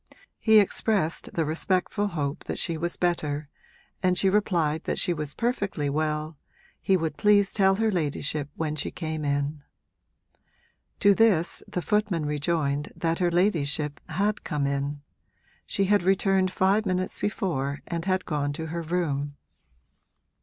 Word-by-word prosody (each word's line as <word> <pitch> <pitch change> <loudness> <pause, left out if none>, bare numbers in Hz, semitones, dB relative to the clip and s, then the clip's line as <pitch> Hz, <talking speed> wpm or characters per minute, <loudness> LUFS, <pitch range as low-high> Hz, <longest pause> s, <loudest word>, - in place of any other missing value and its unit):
He 220 -1 +5
expressed 200 -4 +1
the 165 - +1
respectful 185 +6 0
hope 150 -6 -3
that - - -4
she 170 - -1
was 170 +2 -3
better 150 -5 -1 0.5
and 180 -1 +2
she 190 0 +3
replied 170 -6 +1
that - - -1
she 175 - +2
was 150 -3 -5
perfectly 200 - -1
well 155 0 -2 0.4
he 190 - +3
would 160 -3 -3
please 205 -1 +4
tell 195 -2 +4
her 220 +1 +1
ladyship 150 -3 -1
when 155 -2 -2
she 150 - -2
came 155 -2 -4
in. 145 +1 -1 1.4
To 200 0 +6
this 195 -6 +3
the 180 - -3
footman 205 -7 0
rejoined 150 -1 -1
that 165 -1 -1
her 175 -1 +2
ladyship 155 -5 +1
had 200 +6 0
come 150 -4 -1
in 140 +1 -2 0.6
she 195 - +1
had 205 +1 +3
returned 190 0 +2
five 195 +3 +2
minutes 185 0 -1
before 150 - -2
and 170 -1 -4
had 185 -1 0
gone 145 -3 -1
to 160 +2 -5
her 170 - -2
room. 150 -4 -2
170 Hz, 145 wpm, -26 LUFS, 150-190 Hz, 1.4 s, To